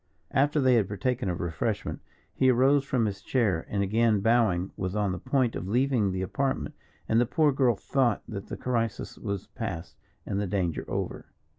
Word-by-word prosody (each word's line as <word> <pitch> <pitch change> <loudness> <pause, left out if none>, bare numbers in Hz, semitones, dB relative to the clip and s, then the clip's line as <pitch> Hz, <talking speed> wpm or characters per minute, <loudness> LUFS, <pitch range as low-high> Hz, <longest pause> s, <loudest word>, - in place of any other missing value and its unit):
After 145 +2 +2
they 130 -2 +4
had 105 -5 +2
partaken 105 +1 -1
of 85 - -2
refreshment, 80 -4 -2 0.3
he 130 - +3
arose 135 +3 +4
from 130 -4 0
his 100 -2 -3
chair, 105 -9 0
and, 100 -1 0
again 110 +1 +2
bowing, 100 -4 +2
was 95 +1 -3
on 105 -2 +1
the 90 - -4
point 125 +3 +1
of 90 - -4
leaving 120 -1 +2
the 95 0 -2
apartment, 135 +8 -2 0.3
and 115 +1 +3
the 120 - +1
poor 155 +2 +3
girl 130 -4 +3
thought 120 +2 0
that 100 -1 -6
the - - -6
crisis 115 -3 -2
was 100 -2 -4
past 95 -8 -6 0.3
and 100 - -1
the 100 - -1
danger 90 -5 -1
over. - - -3
110 Hz, 185 wpm, -28 LUFS, 95-130 Hz, 0.3 s, they